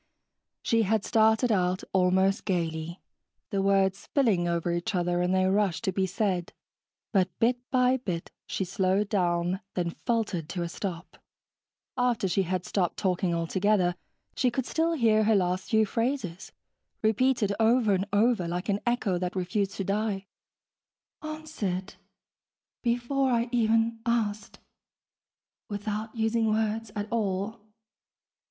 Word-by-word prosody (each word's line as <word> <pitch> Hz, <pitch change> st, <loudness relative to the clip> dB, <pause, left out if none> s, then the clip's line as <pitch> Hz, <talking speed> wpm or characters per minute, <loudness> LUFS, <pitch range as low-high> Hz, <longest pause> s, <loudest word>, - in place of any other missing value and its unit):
She 230 Hz, -2 st, +2 dB
had 215 Hz, 0 st, +1 dB
started 220 Hz, +1 st, +3 dB
out 185 Hz, -2 st, +1 dB
almost 190 Hz, +1 st, +3 dB
gaily, 165 Hz, -1 st, -2 dB, 0.5 s
the 195 Hz, -, +1 dB
words 195 Hz, 0 st, +2 dB
spilling 215 Hz, -11 st, +1 dB
over 170 Hz, 0 st, 0 dB
each 175 Hz, +5 st, -2 dB
other 175 Hz, 0 st, +1 dB
in 180 Hz, +1 st, +1 dB
their 185 Hz, 0 st, +3 dB
rush 200 Hz, -3 st, +1 dB
to 205 Hz, -4 st, 0 dB
be 190 Hz, 0 st, 0 dB
said, 185 Hz, -2 st, -1 dB, 0.6 s
but 190 Hz, -3 st, +3 dB
bit 245 Hz, +2 st, +2 dB
by 255 Hz, 0 st, +3 dB
bit 180 Hz, -9 st, -4 dB, 0.2 s
she 190 Hz, -, -2 dB
slowed 190 Hz, +2 st, +1 dB
down, 175 Hz, -2 st, +1 dB, 0.2 s
then 175 Hz, -2 st, -1 dB
faltered 205 Hz, -7 st, -2 dB
to 175 Hz, -3 st, -3 dB
a 170 Hz, -, -4 dB
stop. 180 Hz, -1 st, -6 dB, 0.8 s
After 240 Hz, -4 st, +1 dB
she 185 Hz, +2 st, +1 dB
had 185 Hz, -1 st, -2 dB
stopped 180 Hz, -4 st, -1 dB
talking 180 Hz, -3 st, 0 dB
altogether, 180 Hz, +2 st, +1 dB, 0.4 s
she 255 Hz, -, +2 dB
could 245 Hz, +1 st, -2 dB
still 330 Hz, +4 st, 0 dB
hear 220 Hz, -7 st, +3 dB
her 220 Hz, 0 st, +4 dB
last 185 Hz, -1 st, 0 dB
few 220 Hz, -1 st, +4 dB
phrases, 225 Hz, -5 st, -2 dB, 0.5 s
repeated 220 Hz, -1 st, +2 dB
over 225 Hz, -1 st, +4 dB
and 190 Hz, +1 st, 0 dB
over, 210 Hz, -3 st, +2 dB
like 180 Hz, +4 st, -3 dB
an 200 Hz, 0 st, +1 dB
echo 210 Hz, -7 st, +1 dB
that 180 Hz, +1 st, -3 dB
refused 190 Hz, +2 st, -1 dB
to 195 Hz, -, -2 dB
die. 200 Hz, 0 st, -1 dB, 1.0 s
(Answered... 305 Hz, -12 st, -4 dB, 0.9 s
before 245 Hz, +3 st, +1 dB
I 235 Hz, -1 st, +1 dB
even 225 Hz, -1 st, +2 dB
asked... 215 Hz, -3 st, -1 dB, 1.1 s
without 210 Hz, +2 st, -4 dB
using 225 Hz, 0 st, +1 dB
words 220 Hz, 0 st, 0 dB
at 205 Hz, 0 st, -3 dB
all 210 Hz, 0 st, -1 dB
200 Hz, 135 wpm, -28 LUFS, 185-225 Hz, 1.1 s, her